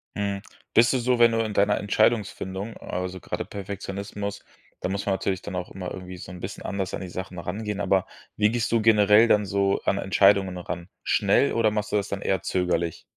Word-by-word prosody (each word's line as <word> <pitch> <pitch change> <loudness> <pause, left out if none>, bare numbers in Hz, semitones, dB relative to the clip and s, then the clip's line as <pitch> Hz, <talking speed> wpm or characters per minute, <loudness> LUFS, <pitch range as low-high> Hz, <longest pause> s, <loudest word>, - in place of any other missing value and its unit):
Mhm, 100 -1 -2 0.3
bist 120 +1 +6
du - - +2
so, 125 0 +1
wenn 115 -1 +7
du 115 - 0
in 110 -2 -1
deiner 100 +1 +3
Entscheidungsfindung 105 -1 0
also 90 0 -4
grade - - -4
Perfektionismus, 100 +1 -5 0.4
da - - -2
muss 100 +1 -2
man 100 - +1
natürlich 95 -1 -1
dann 100 -2 -6
auch 90 0 -4
immer 90 -1 -6
irgendwie 90 0 -8
so 85 - -9
'n 90 - -9
bisschen 95 - -6
anders 95 -2 -3
an - - -3
die 95 - -5
Sachen 90 0 -6
rangehen, 105 +4 -4
aber 95 -2 +2 0.3
wie 105 0 +3
gehst 120 -1 -1
du 115 - +3
generell 105 0 +6
dann 105 -1 +4
so 100 0 +1
an 100 - +2
Entscheidungen 95 -1 +3
ran? 85 0 -6
Schnell - - +3
oder 115 -2 +3
machst 105 -1 -2
du - - +3
das 100 -1 0
dann 100 0 -3
eher 95 - 0
zögerlich? 85 -3 -1
100 Hz, 210 wpm, -25 LUFS, 95-105 Hz, 0.4 s, wenn